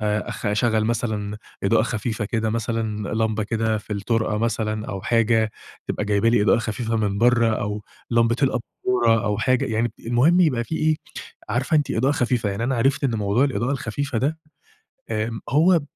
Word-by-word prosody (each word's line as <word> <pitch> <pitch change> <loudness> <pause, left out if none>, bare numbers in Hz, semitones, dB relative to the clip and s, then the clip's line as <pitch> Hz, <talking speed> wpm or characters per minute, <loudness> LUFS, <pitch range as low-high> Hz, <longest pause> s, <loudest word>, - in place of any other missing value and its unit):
آآ 105 0 -1
أخ - - -5
أشغل 110 +1 +2
مثلًا 110 -3 -2 0.3
إضاءة - - +4
خفيفة 110 0 -2
كده، 110 +1 -1
مثلًا 110 -2 -2
لمبة 110 -1 0
كده 110 0 0
في 105 - -8
الطرقة 110 +1 0
مثلًا، 110 -1 -1
أو 95 -2 -5
حاجة 115 -1 +2 0.4
تبقى - - -2
جايبة 105 +2 +2
لي 115 -3 +3
إضاءة 110 - +4
خفيفة 115 +1 -2
من 100 -2 0
برّه 120 -1 +4
أو 105 +1 -3 0.3
لمبة 115 0 +3
الأباچورة، 125 -1 0 0.2
أو 105 -1 0
حاجة 130 +2 +2
يعني 115 +2 0
ب - - -15
المهم 140 +10 +4
يبقى 125 -9 +2
في 160 - -4
إيه 155 -1 +2 0.5
عارفة 130 +8 +1
أنتِ 150 -2 +1
إضاءة 130 +6 +2
خفيفة 120 -5 0
يعني. 100 +4 -3
أنا 130 0 0
عرفت 135 +4 +1
إن 120 -4 +1
موضوع 105 +5 +2
الإضاءة 130 -2 -1
الخفيفة 135 0 -2
ده 150 +6 0 0.7
آآ 110 +1 -2
هو 165 +3 +4
115 Hz, 175 wpm, -23 LUFS, 110-125 Hz, 0.7 s, إضاءة